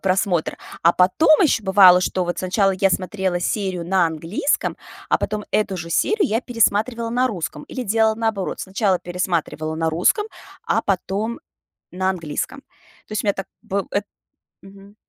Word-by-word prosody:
просмотр. 185 -3 0 0.3
А 170 - +6
потом 310 - +4
еще 300 -9 +3
бывало, 190 -2 +7
что 185 0 -1
вот 175 - -3
сначала 190 +2 +2
я 195 - +4
смотрела 185 -1 -1
серию 185 -3 -2
на 180 -1 +2
английском, 165 - -1 0.3
а - - +3
потом 210 0 -3
эту 205 -3 0
же 170 -1 -7
серию 415 - +2
я 225 +2 +1
пересматривала 230 -1 0
на 250 +2 +2
русском. 170 - -5
Или 255 - -5
делала 220 0 +2
наоборот- 220 -4 -2
сначала 190 -1 0
пересматривала 170 -3 -2
на 160 0 0
русском, 185 - +2 0.4
а - - +1
потом 200 - -2 0.5
на 185 +1 -1
английском. 175 - -4 0.5
То - - -20
есть 215 - -2
у - - -3
меня 200 - +3
так 195 - -5 0.2
б 195 0 -2
эт 205 - -1 0.6
Мгм. 195 +1 -15
195 Hz, 165 wpm, -21 LUFS, 180-220 Hz, 0.6 s, бывало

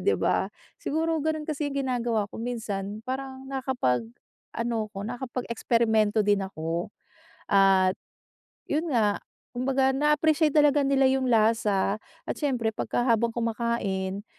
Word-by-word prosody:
'di - - +2
ba? - - +1 0.3
Siguro, 320 +1 0
ganun 310 0 -1
kasi 300 -1 -2
yung 280 - -6
ginagawa 240 -4 0
ko - - -7
minsan, 215 -3 -4
parang 265 +1 -5
nakapag 260 - 0 0.6
ano 230 -2 -1
ako, 195 -1 -7
nakapag-eksperimento 230 -3 0
din 205 0 +3
ako 170 -3 -3 0.6
at 195 -1 +4 0.7
yun 315 +3 -1
nga, 215 -5 +3 0.4
kumbaga 265 +1 +2
na-appreciate 300 +2 +3
talaga 295 -1 +4
nila 275 -1 +3
yung 260 -1 +1
lasa 215 -3 +2 0.3
at - - -2
siyempre 245 -7 -1
pagka 240 - -1
habang 235 -1 +3
kumakain 220 -4 -2
235 Hz, 125 wpm, -27 LUFS, 210-270 Hz, 0.7 s, at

